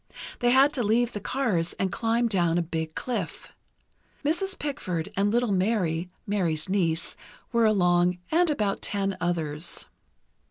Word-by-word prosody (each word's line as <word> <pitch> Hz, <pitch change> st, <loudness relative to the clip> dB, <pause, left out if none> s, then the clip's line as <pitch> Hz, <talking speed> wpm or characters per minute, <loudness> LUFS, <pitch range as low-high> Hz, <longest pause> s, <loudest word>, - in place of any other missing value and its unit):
They 240 Hz, -, +3 dB
had 270 Hz, +4 st, +5 dB
to 260 Hz, -, 0 dB
leave 235 Hz, +2 st, +2 dB
the 205 Hz, -, -3 dB
cars 200 Hz, -8 st, 0 dB
and 190 Hz, -1 st, -2 dB
climb 230 Hz, +3 st, +1 dB
down 175 Hz, -6 st, +2 dB
a 175 Hz, -, +1 dB
big 160 Hz, -1 st, -4 dB
cliff. 220 Hz, -9 st, -4 dB, 0.8 s
Mrs. 385 Hz, +6 st, 0 dB
Pickford 185 Hz, -, -3 dB
and 200 Hz, +1 st, +2 dB
little 240 Hz, 0 st, +1 dB
Mary 185 Hz, -4 st, 0 dB, 0.2 s
(Mary's 175 Hz, -6 st, 0 dB
niece) 170 Hz, -4 st, 0 dB, 0.4 s
were 235 Hz, -2 st, +3 dB
along, 180 Hz, -4 st, +3 dB
and 340 Hz, +1 st, +3 dB
about 210 Hz, -9 st, 0 dB
ten 195 Hz, -1 st, -1 dB
others. 165 Hz, -2 st, -1 dB
200 Hz, 145 wpm, -26 LUFS, 175-240 Hz, 0.8 s, had